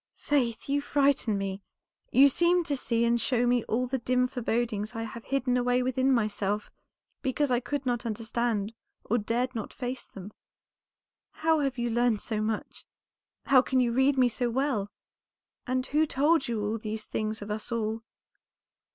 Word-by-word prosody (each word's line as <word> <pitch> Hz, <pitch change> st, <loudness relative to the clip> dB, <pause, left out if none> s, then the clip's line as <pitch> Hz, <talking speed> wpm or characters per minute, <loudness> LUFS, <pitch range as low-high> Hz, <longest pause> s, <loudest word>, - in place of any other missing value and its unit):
"Faith, 245 Hz, -6 st, 0 dB
you 285 Hz, +1 st, +1 dB
frighten 280 Hz, -7 st, +2 dB
me; 195 Hz, 0 st, -3 dB, 0.5 s
you 275 Hz, +2 st, +7 dB
seem 345 Hz, +5 st, +3 dB
to 295 Hz, -3 st, -1 dB
see 235 Hz, -3 st, 0 dB
and 235 Hz, 0 st, +2 dB
show 245 Hz, -2 st, +1 dB
me 245 Hz, -1 st, +2 dB
all 245 Hz, +3 st, 0 dB
the 260 Hz, +1 st, -2 dB
dim 250 Hz, +1 st, +1 dB
forebodings 230 Hz, -3 st, -2 dB
I 225 Hz, -, -3 dB
have 225 Hz, +1 st, -8 dB
hidden 260 Hz, -2 st, 0 dB
away 245 Hz, 0 st, +2 dB
within 260 Hz, +1 st, +1 dB
myself, 210 Hz, -3 st, 0 dB, 0.5 s
because 275 Hz, 0 st, 0 dB
I 245 Hz, -, +3 dB
could 270 Hz, +3 st, -4 dB
not 245 Hz, -1 st, 0 dB
understand 230 Hz, -1 st, -2 dB, 0.3 s
or 240 Hz, -, +1 dB
dared 240 Hz, +4 st, -1 dB
not 225 Hz, -4 st, -5 dB
face 250 Hz, -1 st, -5 dB
them. 200 Hz, +1 st, -10 dB, 1.0 s
How 320 Hz, 0 st, +1 dB
have 275 Hz, -3 st, -1 dB
you 240 Hz, -1 st, -1 dB
learned 240 Hz, -2 st, +2 dB
so 215 Hz, 0 st, -2 dB
much? 215 Hz, 0 st, -3 dB, 0.6 s
How 265 Hz, -2 st, +6 dB
can 260 Hz, 0 st, 0 dB
you 245 Hz, -2 st, +2 dB
read 265 Hz, +3 st, +3 dB
me 255 Hz, -1 st, +5 dB
so 240 Hz, +1 st, -1 dB
well? 240 Hz, -5 st, 0 dB, 0.8 s
and 255 Hz, 0 st, 0 dB
who 310 Hz, +3 st, +2 dB
told 295 Hz, +1 st, +2 dB
you 220 Hz, -1 st, -2 dB
these 215 Hz, 0 st, -5 dB
things 215 Hz, -1 st, -3 dB
of 205 Hz, -, -6 dB
us 215 Hz, +2 st, -3 dB
all?" 225 Hz, -1 st, -1 dB
245 Hz, 170 wpm, -28 LUFS, 220-265 Hz, 1.0 s, you